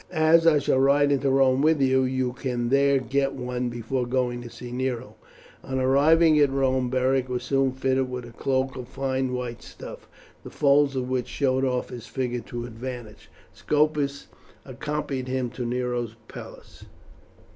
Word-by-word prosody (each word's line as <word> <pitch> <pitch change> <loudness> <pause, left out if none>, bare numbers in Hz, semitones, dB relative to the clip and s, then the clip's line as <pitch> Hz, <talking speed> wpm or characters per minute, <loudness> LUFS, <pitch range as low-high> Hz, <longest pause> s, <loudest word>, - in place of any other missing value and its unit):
As 165 0 +4
I 155 -2 +6
shall 135 -2 +1
ride 140 +1 +4
into 140 0 +1
Rome 135 0 +3
with 155 0 +3
you, 130 -1 +3
you 130 -1 -1
can 125 -2 -2
there 140 +1 +4
get 135 +2 0
one 125 -1 -3
before 120 +2 -3
going 125 -1 -1
to 120 - -9
see 120 +1 -9
Nero." 125 -1 -3 0.5
On 130 - -3
arriving 150 +5 +4
at 145 -1 +5
Rome 130 -2 +1
Beric 130 0 +1
was 125 -1 -2
soon 135 +1 +1
fitted 130 0 0
with 125 -1 -5
a 120 - -11
cloak 130 +2 -1
of 125 -2 -7
fine 130 -1 -2
white 125 -2 -4
stuff, - - -11 0.3
the - - -8
folds 140 -1 +3
of 130 -1 -2
which 125 -1 -1
showed 130 +1 0
off 125 -1 -1
his 120 -2 -9
figure 125 -2 -2
to 120 0 -5
advantage. 120 -2 -8 0.2
Scopus 150 -2 0 0.4
accompanied 135 0 -4
him 130 -2 -2
to 125 -1 -5
Nero's 120 -2 -2
palace. - - -12
130 Hz, 165 wpm, -25 LUFS, 125-135 Hz, 0.5 s, I